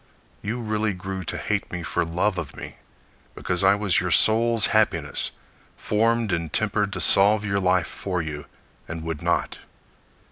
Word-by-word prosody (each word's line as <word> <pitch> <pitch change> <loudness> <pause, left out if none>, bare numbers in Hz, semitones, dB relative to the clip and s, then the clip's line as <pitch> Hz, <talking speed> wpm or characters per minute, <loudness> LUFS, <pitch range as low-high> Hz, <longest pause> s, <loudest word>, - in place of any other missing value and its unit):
You 110 +4 -3
really 110 -2 -1
grew 95 0 -6
to - - -4
hate - - -2
me 90 -1 -4
for 90 - -1
love 90 +4 -1
of 75 -5 -7
me, - - -9 0.6
Because 90 0 -2
I 100 +1 +5
was 100 -3 +1
your 90 - -2
soul's 115 +4 +4
happiness, - - +1 0.5
Formed 115 0 +1
and 85 -2 -2
tempered 105 -1 0
To - - -4
solve 105 +2 +5
your 100 -1 0
life 90 -2 +2
for 90 -2 -4
you, 75 -3 -5 0.4
and 80 0 -6
would 80 -2 -4
not. - - -1
95 Hz, 165 wpm, -24 LUFS, 90-105 Hz, 0.6 s, I